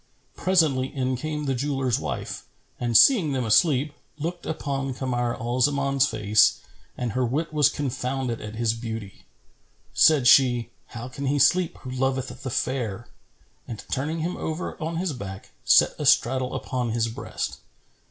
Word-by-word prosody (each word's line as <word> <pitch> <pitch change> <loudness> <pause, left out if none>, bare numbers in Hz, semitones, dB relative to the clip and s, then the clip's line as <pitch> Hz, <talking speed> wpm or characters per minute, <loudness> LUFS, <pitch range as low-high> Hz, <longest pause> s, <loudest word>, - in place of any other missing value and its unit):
Presently 155 -9 +2
in 130 -1 -2
came 150 +3 -4
the 135 - 0
jeweller's 135 -2 -1
wife - - -5 0.3
and 120 -2 +3
seeing 190 - +5
them 130 -2 -1
asleep, 145 +5 +3 0.2
looked 170 +3 -5
upon 135 -4 -3
Kamar 120 -2 -1
al 120 +2 -3
Zaman's 140 0 +2
face 105 0 +3 0.4
and 125 -2 -2
her 130 +4 0
wit 150 +7 -2
was 150 -2 +4
confounded 130 -3 -3
at 105 0 -7
his 115 0 +1
beauty. 115 -4 -7 0.7
Said 150 -5 +5
she, 120 -2 +5 0.2
"How 120 +1 -8
can 135 +2 -5
he 145 +2 +1
sleep 170 +6 +3
who 130 - -6
loveth 130 0 -1
the 130 - -4
fair?" 120 -3 -3 0.6
and, 115 -3 -7
turning 155 +5 -2
him 175 +3 -3
over 160 +3 -4
on 165 +2 -3
his 175 -2 -1
back, 100 -5 -8
sat - - +5
astraddle 130 +1 +2
upon 125 -3 -3
his 115 -1 +1
breast. 115 - -5
130 Hz, 150 wpm, -25 LUFS, 120-145 Hz, 0.7 s, seeing